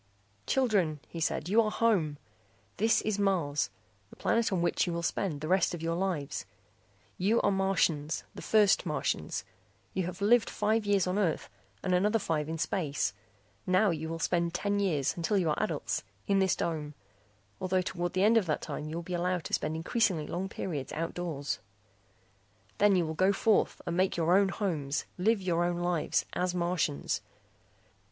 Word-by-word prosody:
"Children," 200 Hz, -, +2 dB
he 170 Hz, -, -7 dB
said, 155 Hz, 0 st, -1 dB
"you 215 Hz, +5 st, +5 dB
are 215 Hz, -, 0 dB
home. 195 Hz, -11 st, +1 dB, 0.6 s
This 220 Hz, +4 st, +3 dB
is 210 Hz, -1 st, -1 dB
Mars, 170 Hz, -, +1 dB, 0.4 s
the -, -, -14 dB
planet 230 Hz, -2 st, +1 dB
on 180 Hz, -3 st, +1 dB
which 175 Hz, -, +1 dB
you 175 Hz, -, -1 dB
will 170 Hz, 0 st, -3 dB
spend 165 Hz, -4 st, -1 dB
the 155 Hz, -, -3 dB
rest 185 Hz, 0 st, +2 dB
of 165 Hz, -, -8 dB
your 165 Hz, 0 st, 0 dB
lives. 170 Hz, -5 st, -2 dB, 0.7 s
You 210 Hz, +6 st, +3 dB
are -, -, +2 dB
Martians, 180 Hz, -6 st, +1 dB
the -, -, -9 dB
first 210 Hz, -3 st, +4 dB
Martians. -, -, -2 dB, 0.5 s
You 185 Hz, -2 st, -1 dB
have 180 Hz, -, -6 dB
lived 220 Hz, +3 st, +4 dB
five 215 Hz, 0 st, 0 dB
years 200 Hz, -3 st, +3 dB
on 185 Hz, +3 st, 0 dB
Earth 170 Hz, -7 st, -1 dB, 0.3 s
and 185 Hz, -, 0 dB
another 205 Hz, +5 st, +3 dB
five 160 Hz, -6 st, -1 dB
in 165 Hz, -, -3 dB
space. 150 Hz, -, -1 dB, 0.5 s
Now 185 Hz, +2 st, +4 dB
you 160 Hz, -1 st, -3 dB
will 165 Hz, -, -3 dB
spend 170 Hz, 0 st, 0 dB
ten 205 Hz, +2 st, 0 dB
years, 155 Hz, -9 st, +1 dB
until 175 Hz, +4 st, 0 dB
you 170 Hz, -5 st, +2 dB
are -, -, -1 dB
adults, -, -, -2 dB, 0.2 s
in 195 Hz, -1 st, +2 dB
this 190 Hz, -1 st, +3 dB
dome, 150 Hz, -3 st, -3 dB, 0.6 s
although 185 Hz, 0 st, +1 dB
toward 175 Hz, -1 st, -3 dB
the 185 Hz, -, +2 dB
end 225 Hz, +2 st, +5 dB
of 205 Hz, -6 st, +2 dB
that 155 Hz, -, -1 dB
time 150 Hz, -, -5 dB
you 160 Hz, -, -5 dB
will 170 Hz, -, -4 dB
be 180 Hz, -, -6 dB
allowed 180 Hz, 0 st, 0 dB
to -, -, -7 dB
spend 155 Hz, +1 st, 0 dB
increasingly 175 Hz, -1 st, +1 dB
long 185 Hz, +3 st, -3 dB
periods 150 Hz, -10 st, -4 dB
outdoors. 165 Hz, -3 st, -3 dB, 1.2 s
"Then 205 Hz, -1 st, +5 dB
you 175 Hz, -2 st, +2 dB
will 160 Hz, -, -3 dB
go 185 Hz, +4 st, +3 dB
forth 205 Hz, +2 st, +2 dB
and 170 Hz, -, -2 dB
make 185 Hz, -1 st, +2 dB
your 170 Hz, +2 st, +3 dB
own 195 Hz, 0 st, +4 dB
homes, 155 Hz, -10 st, -2 dB
live 210 Hz, +1 st, +2 dB
your 175 Hz, -2 st, +1 dB
own 175 Hz, 0 st, 0 dB
lives, 175 Hz, -2 st, 0 dB
as 180 Hz, 0 st, -1 dB
Martians. 170 Hz, -, 0 dB
180 Hz, 180 wpm, -30 LUFS, 160-195 Hz, 1.2 s, you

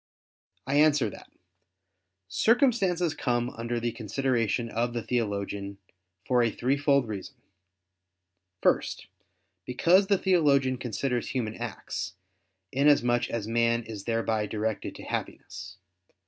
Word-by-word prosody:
I 140 Hz, +2 st, +1 dB
answer 145 Hz, -7 st, +4 dB
that, -, -, -13 dB, 1.0 s
Circumstances 190 Hz, -, +2 dB
come 120 Hz, -4 st, -1 dB
under 115 Hz, +1 st, -3 dB
the 120 Hz, 0 st, -1 dB
consideration 120 Hz, 0 st, -1 dB
of 120 Hz, +1 st, -1 dB
the 120 Hz, -2 st, -3 dB
theologian, 100 Hz, -4 st, -2 dB, 0.5 s
for 125 Hz, -1 st, +3 dB
a 120 Hz, -, +3 dB
threefold 140 Hz, +2 st, +1 dB
reason. 100 Hz, -3 st, -6 dB, 1.3 s
First, -, -, +1 dB, 0.6 s
because 175 Hz, +10 st, +3 dB
the 200 Hz, -1 st, +4 dB
theologian 140 Hz, -9 st, +3 dB
considers 125 Hz, 0 st, -2 dB
human 115 Hz, -5 st, -2 dB
acts, 110 Hz, -5 st, -5 dB, 0.6 s
inasmuch 125 Hz, -4 st, +3 dB
as 110 Hz, -3 st, -3 dB
man 115 Hz, +1 st, +2 dB
is 110 Hz, -3 st, -8 dB
thereby 115 Hz, -2 st, 0 dB
directed 110 Hz, 0 st, -3 dB
to -, -, -10 dB
Happiness. 95 Hz, 0 st, -6 dB
120 Hz, 110 wpm, -28 LUFS, 110-140 Hz, 1.3 s, answer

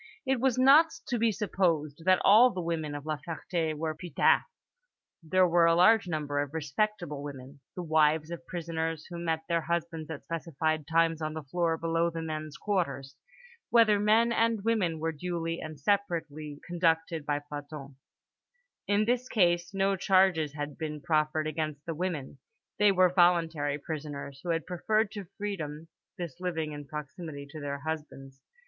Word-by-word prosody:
It 265 Hz, -1 st, +1 dB
was 260 Hz, -2 st, +2 dB
not 280 Hz, +5 st, +7 dB, 0.2 s
to 240 Hz, -3 st, 0 dB
be 230 Hz, 0 st, +3 dB
supposed 170 Hz, -7 st, -1 dB
that 185 Hz, -1 st, +5 dB
all 225 Hz, +5 st, +8 dB
the 190 Hz, -, -5 dB
women 165 Hz, -3 st, -2 dB
of 145 Hz, 0 st, -7 dB
La 155 Hz, -1 st, -2 dB
Ferté 165 Hz, 0 st, -3 dB
were 155 Hz, +1 st, -2 dB
putains: 155 Hz, -1 st, +2 dB, 0.8 s
there 180 Hz, +3 st, +3 dB
were 170 Hz, 0 st, +4 dB
a 165 Hz, -, +4 dB
large 200 Hz, +3 st, +5 dB
number 150 Hz, -3 st, -2 dB
of 145 Hz, +1 st, -3 dB
respectable 160 Hz, 0 st, -2 dB
women, 140 Hz, -1 st, -9 dB, 0.2 s
the 180 Hz, -, -4 dB
wives 155 Hz, 0 st, +2 dB
of 170 Hz, 0 st, -7 dB
prisoners, 165 Hz, -2 st, -3 dB
who 170 Hz, -, -5 dB
met 160 Hz, -1 st, -1 dB
their 170 Hz, -1 st, +1 dB
husbands 165 Hz, -1 st, -3 dB
at 155 Hz, -4 st, -6 dB
specified 155 Hz, -1 st, -2 dB
times 165 Hz, 0 st, +2 dB
on 155 Hz, 0 st, -3 dB
the 155 Hz, -, -5 dB
floor 165 Hz, +3 st, 0 dB
below 165 Hz, +1 st, +1 dB
the 165 Hz, -1 st, -5 dB
men's 155 Hz, -1 st, -5 dB
quarters, 140 Hz, -9 st, -2 dB, 0.5 s
whither 225 Hz, -3 st, +5 dB
man 220 Hz, +3 st, +4 dB
and 230 Hz, -2 st, +1 dB
woman 200 Hz, -8 st, +1 dB
were 165 Hz, +1 st, -1 dB
duly 165 Hz, +1 st, -3 dB
and 155 Hz, -2 st, -7 dB
separately 155 Hz, -5 st, -1 dB
conducted 165 Hz, -2 st, 0 dB
by 145 Hz, 0 st, 0 dB
plantons. 145 Hz, -1 st, -8 dB, 0.9 s
In 205 Hz, +2 st, +2 dB
this 245 Hz, +2 st, 0 dB
case 175 Hz, -4 st, +2 dB
no 195 Hz, 0 st, +1 dB
charges 185 Hz, -6 st, +3 dB
had 145 Hz, -1 st, -5 dB
been 150 Hz, -1 st, -4 dB
preferred 155 Hz, 0 st, +1 dB
against 155 Hz, -2 st, -3 dB
the 165 Hz, -, -3 dB
women; 155 Hz, -5 st, -4 dB, 0.4 s
they 210 Hz, -1 st, +6 dB
were 185 Hz, -1 st, +4 dB
voluntary 165 Hz, -5 st, +3 dB
prisoners, 145 Hz, -2 st, -6 dB
who 175 Hz, -, -5 dB
had 165 Hz, -1 st, 0 dB
preferred 215 Hz, +4 st, 0 dB
to 205 Hz, -2 st, -6 dB
freedom 165 Hz, -6 st, -5 dB, 0.3 s
this 170 Hz, -3 st, -6 dB
living 165 Hz, -4 st, -2 dB
in 145 Hz, -1 st, -8 dB
proximity 150 Hz, 0 st, -7 dB
to 155 Hz, -, -8 dB
their 140 Hz, 0 st, -3 dB
husbands. 140 Hz, -3 st, -6 dB
165 Hz, 165 wpm, -29 LUFS, 150-180 Hz, 0.9 s, all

